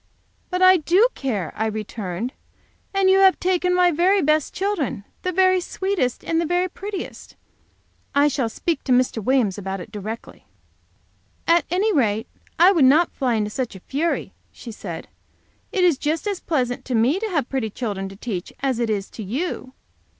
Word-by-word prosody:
"But 365 0 0
I 370 0 +8
do 360 +9 +4
care," 210 - -3
I 220 - 0
returned; 215 +1 -4 0.6
"and 390 -1 +2
you 380 0 +5
have 385 -1 +5
taken 360 0 +1
my 360 -1 +4
very 365 +5 +3
best 305 -2 +2
children 375 - -2 0.2
the 365 - -1
very 370 0 +3
sweetest 370 -9 -2
and 330 0 +1
the - - -1
very 355 +2 +1
prettiest. 390 +1 -7 0.8
I 285 +1 +5
shall 265 -5 0
speak 330 +8 -2
to 260 - -1
Mr. 250 -3 +2
Williams 225 -6 +1
about 195 0 -4
it 180 - -9
directly." 215 +2 -7 1.0
"At 335 +1 +4
any 395 +5 +1
rate, 225 -5 +1 0.3
I 355 +3 +7
would 330 -8 +4
not 310 +6 +5
fly 255 -4 0
into 210 -1 -1
such 250 -3 -3
a - - -9
fury," 300 - -2 0.2
she 235 - -10
said. 175 -6 -7 0.6
"It 385 -5 +1
is 335 -7 +4
just 310 +5 -1
as 405 -3 -2
pleasant 250 -6 -1
to 255 - -2
me 250 +11 +3
to 445 - -2
have 300 -9 0
pretty 260 -5 -2
children 200 -4 -4
to 195 - -11
teach 195 -4 -5
as 265 -3 0
it 235 -2 0
is 200 -2 -1
to - - -8
you. 260 - -4
275 Hz, 180 wpm, -22 LUFS, 220-360 Hz, 1.0 s, I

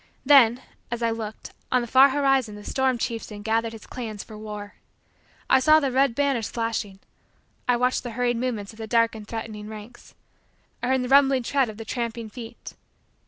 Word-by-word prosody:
Then, 255 -3 +6 0.3
as 235 0 -3
I 230 - +2
looked, 220 -1 -6 0.2
on 250 - +3
the - - -5
far 265 +4 +7
horizon 270 -5 +1
the 210 - -10
storm 265 +2 0
chieftain 225 -3 -4
gathered 225 +1 0
his 225 - -11
clans 220 -5 -6
for 220 - -12
war. 210 -1 -8 0.7
I 265 - +5
saw 310 +4 +6
the 275 -3 -1
red 265 -1 +2
banners 275 -5 0
flashing. 225 -4 -3 0.7
I 245 -1 +3
watched 250 +1 +1
the 240 -2 -7
hurried 245 -1 +1
movements 230 -4 -3
of 220 - -17
the 220 - -5
dark 230 0 +3
and 215 -2 -9
threatening 220 -2 -6
ranks. 215 +2 -11 0.7
I 245 - -2
heard 260 0 +2
the 250 - -4
rumbling 270 -2 +5
tread 270 0 +1
of 215 - -9
the 225 - -7
tramping 230 -2 -4
feet. 235 0 -9
235 Hz, 190 wpm, -25 LUFS, 220-255 Hz, 0.7 s, far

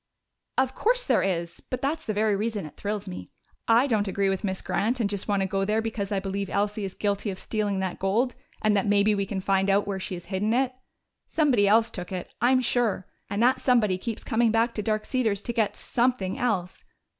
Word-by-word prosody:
"Of 265 0 +2
course - - +1
there - - +3
is. 170 -3 -2
But 255 0 -4
that's 315 +3 -1
the 215 - 0
very 210 0 +2
reason 210 -2 -2
it 150 - -11
thrills 210 0 -4
me. 180 - -7 0.4
I 230 +3 +5
don't 215 -6 +1
agree 195 0 +1
with 195 -1 -2
Miss 190 -2 -2
Grant 230 +6 0
and 225 - +2
just 200 -1 -3
want 200 -2 +1
to - - 0
go 195 +1 0
there 210 +2 +1
because 220 -2 -3
I 200 - +1
believe 195 0 -3
Elsie 205 +1 -1
is 190 - -6
guilty 205 0 -1
of 190 - -4
stealing 205 -3 -1
that 190 -2 -3
gold 225 +7 +1 0.3
and 215 -1 +3
that 200 0 +1
maybe 205 +1 +4
we 200 -1 -1
can 190 -1 -3
find 195 0 +1
out 200 +1 +3
where 195 -1 -3
she 185 - -4
has 175 - -9
hidden 210 +4 +1
it. 260 0 +1 0.5
Somebody 255 -10 +3
else 225 +2 +4
took 180 -1 -6
it, 185 -1 -5
I'm 255 +2 +4
sure 235 -6 +1 0.2
and 205 +3 0
that 255 +2 +3
somebody 215 -8 +3
keeps 230 +2 -5
coming 230 0 +2
back 230 +2 +2
to 210 - -2
Dark 215 0 -1
Cedars 220 -6 0
to 235 - -3
get 220 -3 +1
something 235 -6 0
else. 190 -7 -2
210 Hz, 225 wpm, -26 LUFS, 195-230 Hz, 0.5 s, I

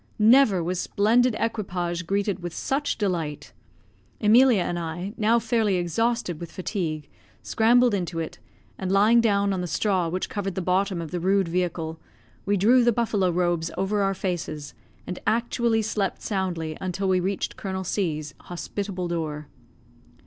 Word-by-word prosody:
Never 220 -4 +5
was 180 +2 -2
splendid 230 +3 +2
equipage 180 -6 -2
greeted 200 0 0
with 175 -1 -6
such 285 +2 -1
delight. 170 -8 -3 0.7
Emilia 225 -1 +5
and 175 0 -2
I, 175 +4 -5
now 225 0 +3
fairly 225 -3 +1
exhausted 180 +1 -1
with 170 - -7
fatigue, 165 -6 -3 0.4
scrambled 240 +1 +4
into 180 -3 -2
it, 160 -1 -4 0.4
and 190 -1 -2
lying 215 +4 +5
down 200 -3 +2
on 185 - -2
the 180 - -3
straw 180 +1 0
which 185 +2 -2
covered 195 -3 -4
the 190 - -1
bottom 185 -1 0
of 160 - -8
the 180 - -2
rude 190 +1 +2
vehicle, 165 -2 -2 0.5
we 205 0 +2
drew 240 +6 +5
the 240 - +4
buffalo 210 -5 +1
robes 175 -1 0
over 205 +2 0
our 195 0 +1
faces, 170 -6 -4 0.3
and 180 - -5
actually 230 0 +1
slept 205 -3 -2
soundly 175 -6 -2
until 190 +1 -2
we 185 -1 +3
reached 190 +2 -2
Colonel 190 -1 -4
C 175 -4 -1
's 150 -2 -8
hospitable 185 +1 -5
door. 155 -3 -4
190 Hz, 155 wpm, -25 LUFS, 175-215 Hz, 0.7 s, Never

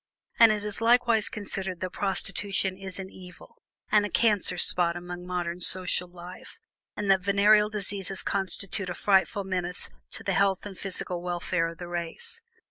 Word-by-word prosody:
And 230 -1 +8
it 210 -1 -1
is 210 +1 -3
likewise 235 -2 +4
conceded 195 -3 -5
that 185 - -3
prostitution 195 0 -1
is 190 -1 -8
an 190 -1 -7
evil, 180 -1 -14 0.3
and 210 -1 +5
a 205 - -2
cancer 205 -3 +2
spot 175 -1 +3
upon 175 0 -8
modern 175 -1 -3
social 180 0 +2
life, 175 +1 -12 0.4
and 205 -2 +1
that 190 -1 +4
venereal 210 +2 +4
diseases 195 -2 -2
constitute 195 0 0
a 175 - -4
frightful 200 +2 +2
menace 180 - -4 0.2
to - - -4
the - - 0
health 195 -1 +2
and 200 -2 -7
physical 180 -2 -4
welfare 175 -1 -1
of 165 0 -8
the 175 - -7
race. 175 - -5
190 Hz, 165 wpm, -27 LUFS, 180-205 Hz, 0.4 s, And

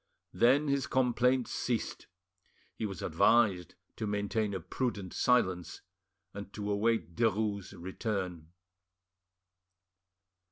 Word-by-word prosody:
Then 140 +5 +4
his 140 -4 0
complaints 125 0 +2
ceased; 120 -3 -2 0.7
he 110 - -3
was 95 -3 -7
advised 95 +1 +3 0.2
to 110 - -3
maintain 105 +1 -1
a - - -2
prudent 100 0 -3
silence, 95 -8 +1 0.5
and 100 0 -8
to 105 -1 -3
await 105 -4 0
Derues' 105 -3 0
return. 90 -3 -4
105 Hz, 95 wpm, -31 LUFS, 95-120 Hz, 0.7 s, Then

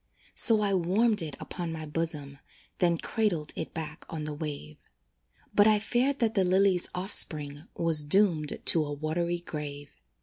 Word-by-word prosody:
So 225 -3 +6
I 200 -1 0
warmed 195 +4 +1
it 155 -4 -6
upon 175 -2 -6
my 160 -1 -6
bosom, 150 -3 -5 0.4
Then 170 -2 +2
cradled 175 -7 -2
it 160 - -5
back 160 -1 -7
on 155 -2 -6
the 150 0 -5
wave; 145 - -7 0.7
But 205 +1 +5
I 215 -1 +4
feared 250 +6 0
that 225 -3 0
the 195 -4 +1
lily's 185 0 +2
offspring 155 -6 +2
Was 165 -3 +1
doomed 155 -2 +1
to 160 - +7
a 145 - -6
watery 170 +4 -3
grave. 145 -3 -8
165 Hz, 160 wpm, -27 LUFS, 150-195 Hz, 0.7 s, to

